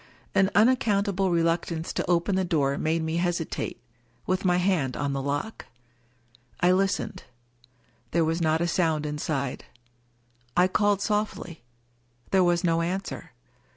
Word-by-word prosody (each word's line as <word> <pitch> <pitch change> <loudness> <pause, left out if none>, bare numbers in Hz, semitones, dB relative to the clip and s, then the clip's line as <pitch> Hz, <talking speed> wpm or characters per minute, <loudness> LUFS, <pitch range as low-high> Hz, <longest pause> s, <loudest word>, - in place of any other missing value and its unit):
An 190 0 +4
unaccountable 200 -4 +3
reluctance 165 -1 0
to - - -2
open 175 +3 +2
the 190 - +1
door 145 -6 +1
made 160 +1 0
me 160 +1 -1
hesitate, 175 0 -2 0.5
with 185 0 0
my 180 -2 +3
hand 180 -8 0
on 140 -1 -1
the 135 - -2
lock. 145 +10 -4 0.9
I 180 - +4
listened. 190 +1 0 0.8
There 170 -1 +2
was 165 +2 -1
not 160 0 +2
a 170 - +1
sound 160 -3 +1
in 150 0 -4
side. 140 -4 -3 0.9
I 180 +1 +6
called 205 +1 +1
softly. 210 - -2 0.7
There 190 -1 +4
was 175 0 +2
no 165 -1 +2
answer. 185 +3 -4
175 Hz, 140 wpm, -26 LUFS, 160-190 Hz, 0.9 s, I